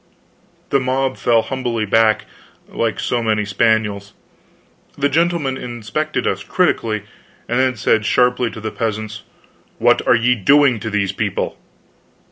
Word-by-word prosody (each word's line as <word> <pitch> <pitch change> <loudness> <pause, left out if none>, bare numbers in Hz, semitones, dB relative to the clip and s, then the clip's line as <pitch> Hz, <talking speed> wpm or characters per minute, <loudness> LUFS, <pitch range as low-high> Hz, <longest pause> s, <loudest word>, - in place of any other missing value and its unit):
The 140 - +4
mob 130 +1 -1
fell 115 -2 +2
humbly 120 -4 -2
back, 110 0 +3 0.4
like 115 -2 -2
so 120 - -1
many 110 -2 0
spaniels. 105 -1 0 0.8
The 145 0 +1
gentleman 160 -3 0
inspected 125 +6 -3
us - - -1
critically, 115 - 0 0.4
then 130 +1 +1
said 110 -1 +1
sharply 125 +2 +2
to 110 - -9
the 110 0 -4
peasants: 110 -1 -4 0.6
"What - - +3
are - - +6
ye 120 +2 +3
doing 130 +3 +4
to 110 - -4
these 100 -3 0
people?" 100 0 -2
115 Hz, 130 wpm, -19 LUFS, 110-130 Hz, 0.8 s, are